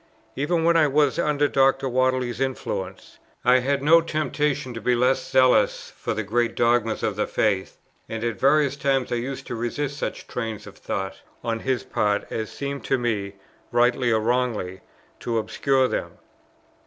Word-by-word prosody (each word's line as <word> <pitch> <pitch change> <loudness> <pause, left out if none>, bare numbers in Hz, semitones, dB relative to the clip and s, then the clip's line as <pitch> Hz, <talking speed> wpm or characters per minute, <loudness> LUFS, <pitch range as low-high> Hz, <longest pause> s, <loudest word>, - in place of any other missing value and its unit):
Even 160 +4 0
when 170 0 +4
I 155 -2 +5
was 145 +2 +2
under 145 -2 +2
Dr. 135 -1 +2
Whately's 130 -1 0
influence, 100 -8 -4 0.3
I 125 +1 +6
had 140 +2 -1
no 165 +3 +6
temptation 150 -5 -1
to 115 - -6
be 125 +3 +2
less 125 +2 +2
zealous 130 -1 +3
for - - -3
the - - -2
great 120 +1 0
dogmas 120 -1 +1
of 105 - 0
the 105 - -1
faith, 100 -3 0 0.3
and 115 0 -4
at 115 -4 -2
various 140 0 +3
times 135 -2 0
I 120 - +1
used 130 +3 -5
to 120 - -5
resist 135 +5 -3
such - - -4
trains 110 -3 -5
of 100 - -12
thought 95 0 -5 0.2
on 115 -1 -1
his 130 +1 -1
part 105 -1 0
as 110 -1 -3
seemed 140 0 -5
to - - +2
me 105 -5 -2 0.4
(rightly 120 +1 +2
or 110 - +3
wrongly) 110 -6 -1 0.4
to 115 -1 -2
obscure 130 +4 +1
them. - - -3
125 Hz, 170 wpm, -24 LUFS, 115-140 Hz, 0.4 s, I